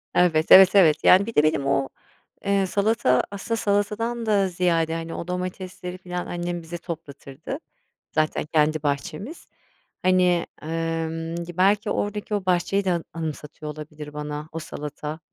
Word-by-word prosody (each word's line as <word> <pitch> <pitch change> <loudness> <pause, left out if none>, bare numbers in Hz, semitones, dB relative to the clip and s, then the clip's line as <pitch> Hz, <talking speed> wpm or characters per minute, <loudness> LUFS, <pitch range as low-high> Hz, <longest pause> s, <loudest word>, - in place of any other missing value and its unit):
Evet, 160 -3 +3
evet, 190 +1 +9
evet, 160 -6 +5
yani, 190 +2 +7
bir 230 - -7
de 150 - +5
benim 155 -3 +1
o, 135 -1 +1 0.6
eee, 200 -1 +2
salata, 200 - +2
aslında, 215 +3 -3
salatadan 215 +3 0
da 205 -3 +3
ziyade, 170 -3 +1
hani, 165 0 -4
o 170 - -6
domatesleri, 180 0 -5
falan, 180 -1 -5
annem 175 0 -3
bize 165 +1 -7
toplatırdı, 160 - -7 0.5
zaten 155 -1 0
kendi 155 0 +1
bahçemiz. 160 - -4 0.5
Hani, 180 -2 +3 0.2
emm, 165 0 -3
gi 175 0 -10
belki, 200 +3 +3
oradaki 210 +1 -2
o 200 -2 -3
bahçeyi 185 +2 +1
de, 185 - +2
a 170 - -2
anımsatıyor 155 -2 -6
olabilir 150 0 -9
bana, 150 +1 -5
o 165 - -4
salata. 150 0 -6
175 Hz, 150 wpm, -24 LUFS, 155-195 Hz, 0.6 s, evet